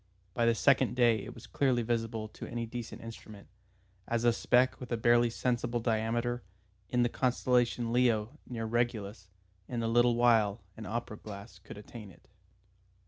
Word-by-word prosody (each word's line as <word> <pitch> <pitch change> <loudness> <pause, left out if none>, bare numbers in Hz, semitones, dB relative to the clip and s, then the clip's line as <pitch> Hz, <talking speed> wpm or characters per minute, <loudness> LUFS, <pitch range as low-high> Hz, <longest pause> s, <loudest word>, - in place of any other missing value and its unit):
By 115 +3 +1
the 115 - +4
second 135 +2 +3
day 120 -3 +4
it - - -9
was 115 - -11
clearly 125 -2 +1
visible 115 -1 -2
to 110 - -9
any 120 0 -3
decent 115 0 -7
instrument, 110 -3 -10 0.6
as 115 0 0
a 120 -1 +4
speck 125 +2 +2
with 125 - -9
a 120 - +1
barely 120 +1 +4
sensible 120 0 -1
diameter, 115 +1 -1 0.5
in 125 -1 +2
the - - +3
constellation 120 -1 +1
Leo 120 0 +2
near 115 -2 -4
Regulus. 110 -4 -2 0.4
In 120 -2 -3
a - - 0
little 120 +1 +4
while 115 -3 +3 0.2
an 110 - -8
opera 115 -2 -4
glass 100 -2 -10
could - - -11
attain 105 0 -10
it. 95 - -19
115 Hz, 165 wpm, -31 LUFS, 110-120 Hz, 0.6 s, the